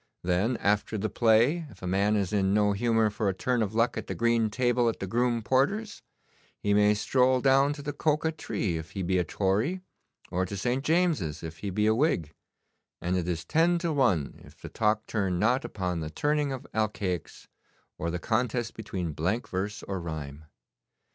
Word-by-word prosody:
Then, 95 +8 +1
after 105 +2 0
the 110 +2 -2
play, 120 +9 +3
if 95 -5 -16
a - - -3
man 100 +3 +2
is 100 -3 -1
in 100 -1 +2
no 105 -1 +3
humour 110 +1 +2
for 105 -1 -1
a 95 - -2
turn 125 +4 0
of 110 0 -2
luck 115 +1 +2
at - - -5
the - - -4
green 115 -1 +2
table 120 +1 +2
at 115 - -4
the - - -3
Groom 120 +3 0
Porter's, 175 - 0 0.6
he 105 - 0
may 105 +1 +4
stroll 130 +4 +2
down 135 +2 +4
to 145 -1 -9
the 145 +1 -3
Coca 155 +1 +1
Tree 95 - -3
if 80 - -10
he 95 - -3
be 90 +1 +1
a - - +2
Tory, 105 - 0 0.5
or 90 +2 0
to 100 - -5
St. 125 +6 -1
James's 160 - +1
if 80 0 -7
he 100 - -4
be 105 +3 0
a 110 - +4
Whig, 110 - 0 0.7
and 90 +1 -1
it 90 -2 -1
is 85 -2 -2
ten 170 +2 +3
to 170 -2 -1
one 105 - +1
if - - -17
the - - -8
talk 110 0 0
turn 95 -5 -1
not 120 +7 +2
upon 90 -3 -3
the 80 -1 -4
turning 150 - 0
of 135 +1 -5
alcaics, 100 -5 -2 0.5
or 85 - -1
the 85 - -2
contest 115 +4 -1
between 95 -7 -4
blank 95 - -1
verse 100 +3 -3
or 95 -1 -4
rhyme. 80 -2 -6
110 Hz, 200 wpm, -28 LUFS, 95-125 Hz, 0.7 s, may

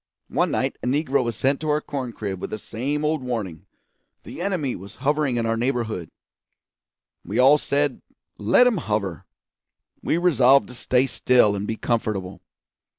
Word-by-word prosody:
One - - +1
night - - -1
a 120 - -4
negro 140 0 +1
was 120 -2 -3
sent 135 +5 0
to 155 - -2
our 150 0 +2
corn 135 -5 -5
crib 100 -4 -5
with - - -4
the 110 - -4
same 140 +8 -3
old 155 -1 0
warning: 110 -10 -5 0.6
the - - -8
enemy 175 -9 -1
was 100 +2 -11
hovering 145 +1 0
in 115 - 0
our 115 0 +1
neighbourhood. 115 -8 -2 1.1
We 105 - -4
all 135 +4 +6
said 145 -2 0 0.4
let 110 - +5
him 245 -4 +3
hover. 105 - -2 0.8
We - - 0
resolved 140 -6 +4
to - - -9
stay 125 +1 +1
still 125 -5 +3
and 100 +1 -4
be 110 - -3
comfortable. 100 -5 -2
125 Hz, 165 wpm, -23 LUFS, 110-145 Hz, 1.1 s, all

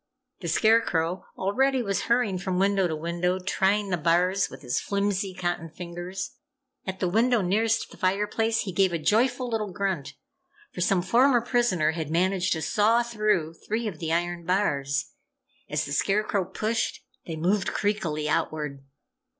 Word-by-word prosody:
The 175 - -6
Scarecrow 180 -3 +2
already 260 +7 +1
was 200 -3 -1
hurrying 235 -6 +1
from 185 -1 -2
window 195 0 +3
to 160 - -2
window, 170 +3 -1
trying 195 +2 +1
the 180 - +1
bars 180 +4 +2
with - - -12
his 125 -1 0
flimsy, 200 -1 -1
cotton 175 -2 -2
fingers. 175 +3 -6 0.6
At 190 0 -4
the 185 - +1
window 230 +5 +3
nearest 220 +5 +1
the - - -13
fireplace 210 +4 +1
he 195 - -4
gave 190 0 +2
a - - +1
joyful 240 - +2
little 220 -4 -2
grunt, 185 -6 -2 0.6
for 180 - -5
some 180 0 +2
former 245 +6 +4
prisoner 235 -10 +1
had 160 -2 -4
managed 185 +2 +1
to 160 -1 -3
saw 220 +7 +3
through 210 -8 0
three 220 +7 -3
of 175 -7 -6
the 160 -1 -3
iron 175 +1 -1
bars. 145 -7 0 0.6
As 150 0 -1
the 140 - -5
Scarecrow 200 +4 +1
pushed, 220 +4 -2 0.2
they 165 - -4
moved 185 +5 +1
creakily 170 -8 -1
outward. 150 -2 -2
190 Hz, 160 wpm, -26 LUFS, 170-215 Hz, 0.6 s, former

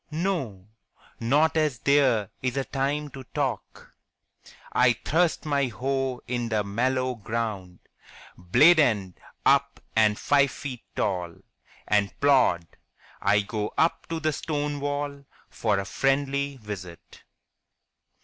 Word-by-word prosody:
No, 155 - -2 0.5
not 145 +8 +2
as 155 -5 +1
there 130 -6 +2
is 125 +1 -2
a 135 - 0
time 145 +2 -2
to 135 0 -9
talk. - - -3 0.8
I 125 -1 +5
thrust 165 +8 0
my 140 -3 +1
hoe 130 +1 -2
in 120 -1 -2
the 110 -2 +1
mellow 130 +5 0
ground, 110 -5 -4 0.5
Blade 150 - +5
end 105 - +1 0.3
up 140 0 +3 0.2
and 110 -2 +4
five 140 -1 +3
feet 130 -2 -7
tall, 90 -4 -2 0.5
And 105 -1 +1
plod: 130 -12 +3 0.6
I 100 +1 +3
go 105 0 -4
up 165 - +1
to 165 0 -3
the 155 -1 0
stone 145 -2 -3
wall 145 0 -3 0.3
For 105 -3 0
a 95 - -2
friendly 140 +4 0
visit. 100 -7 -9
130 Hz, 120 wpm, -26 LUFS, 105-145 Hz, 0.8 s, I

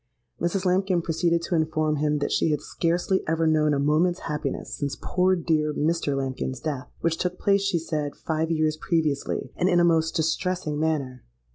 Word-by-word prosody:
Mrs. 185 +3 0
Lambkin 185 -1 +2
proceeded 170 +1 +1
to 175 - -3
inform 155 -1 +1
him 150 0 +1
that 145 - -2
she - - +2
had 150 -2 +1
scarcely 175 +4 0
ever 165 +1 +1
known 155 -1 +3
a 145 - +2
moment's 160 +5 +2
happiness 150 -3 -4
since 140 -1 -3
poor 185 +1 +2
dear 155 -3 0
Mr. 155 -2 0
Lambkin's 130 -1 -3
death, 145 -3 -4
which 165 -1 +1
took 180 0 -1
place, 200 +1 +2
she 195 -3 +1
said, 155 -3 -3
five 160 0 -2
years 155 -1 +1
previously, 155 -4 -1
and 180 - +1
in 175 -2 +4
a 175 - +5
most 160 -1 +2
distressing 160 -1 -1
manner. 140 -6 -1
160 Hz, 180 wpm, -25 LUFS, 150-175 Hz, -, a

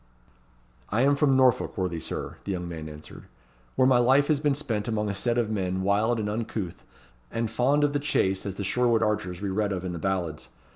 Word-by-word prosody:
"I 115 +5 +2
am 140 +1 +4
from 140 -2 +3
Norfolk, 130 -4 +3
worthy 90 -3 -1
Sir," - - -5
the 100 - -3
young 90 -1 -4
man 80 -2 -6
answered, 75 0 -11 0.5
"where 130 - +4
my 130 -2 +5
life 135 +4 +4
has 150 -2 +3
been 145 -2 +1
spent 110 -7 -2
among 105 -2 -1
a - - -1
set 120 +4 0
of 115 -3 0
men 95 -2 -1
wild 105 +4 +2
and 105 - -2
uncouth, 105 -4 -4 0.5
and 115 -1 -2
fond 135 +6 +2
of 145 0 +2
the 145 - +1
chase 95 -9 0
as 95 - -4
the 100 - -4
Sherwood 120 +2 +2
archers 105 -4 -1
we 100 - -2
read 105 +1 0
of 95 -1 -3
in 90 - -3
the 85 - -5
ballads. 90 -4 -2
105 Hz, 220 wpm, -26 LUFS, 95-125 Hz, 0.5 s, my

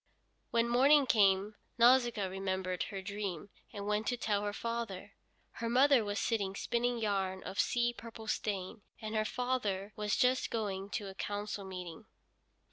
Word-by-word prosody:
When 235 0 +2
morning 275 +4 +5
came 200 -3 +3 0.2
Nausicaa 240 -3 +5
remembered 190 -1 -2
her 195 -1 -5
dream, 200 -2 -4 0.2
and 205 -2 -6
went 210 +1 0
to 245 - 0
tell 210 -3 0
her 205 0 -1
father. 230 -3 -4 0.4
Her 230 - -4
mother 260 0 +5
was 205 0 -3
sitting 200 -4 -1
spinning 240 +3 0
yarn 195 -4 -1
of 195 - -6
sea 240 0 +2
purple 225 -1 -9
stain, 205 -1 -3 0.2
and 215 -1 -5
her 215 -1 +1
father 215 -6 -2
was 210 -1 -1
just 255 +1 +2
going 200 -3 -3
to 210 -4 -2
a 195 - -7
council 205 +1 -4
meeting. 180 -3 -8
210 Hz, 155 wpm, -33 LUFS, 195-235 Hz, 0.4 s, morning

